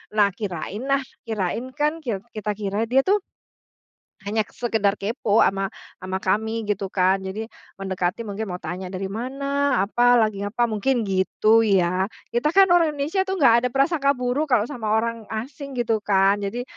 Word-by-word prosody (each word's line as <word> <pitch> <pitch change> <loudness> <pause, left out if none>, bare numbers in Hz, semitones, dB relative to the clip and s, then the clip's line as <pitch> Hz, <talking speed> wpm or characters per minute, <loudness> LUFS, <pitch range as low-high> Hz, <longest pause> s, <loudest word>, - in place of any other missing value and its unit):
Nah, 200 -2 +4
kirain 200 0 -5
nah, 275 0 +2 0.3
kirain 220 +3 -2
kan 300 +2 0
kir 225 -10 -4
kita 210 -1 -3
kira 205 +2 -2
dia 265 +3 +3
tuh 410 +2 +3 1.1
hanya 215 +2 0
sekedar 220 -4 0
kepo 220 0 +1
ama 195 0 +1 0.3
ama 185 0 -3
kami 220 +4 0
gitu 195 -1 -1
kan. 190 +1 +2
Jadi 190 +4 -5 0.3
mendekati 190 +2 -2
mungkin 210 +1 -4
mau 180 - -3
tanya 180 +3 -5
dari 190 +1 -5
mana, 275 +2 -1
apa 245 +4 +3
lagi 215 -3 +2
apa, 215 +4 0
mungkin 235 +3 +1
gitu 200 +3 +3
ya. 185 -1 +2 0.3
Kita 240 +5 +1
kan 390 0 +8
orang 330 -4 +4
Indonesia 300 +7 -1
tuh 385 - -1
enggak 235 -5 +5
ada - - +1
prasangka 280 0 +2
buruk 250 +5 -1
kalau 235 -5 +3
sama 230 -6 -4
orang 230 -1 -2
asing 265 +5 -6
gitu 230 -2 +1
kan. 200 0 +3
Jadi 205 +5 -3
220 Hz, 170 wpm, -23 LUFS, 195-255 Hz, 1.1 s, kan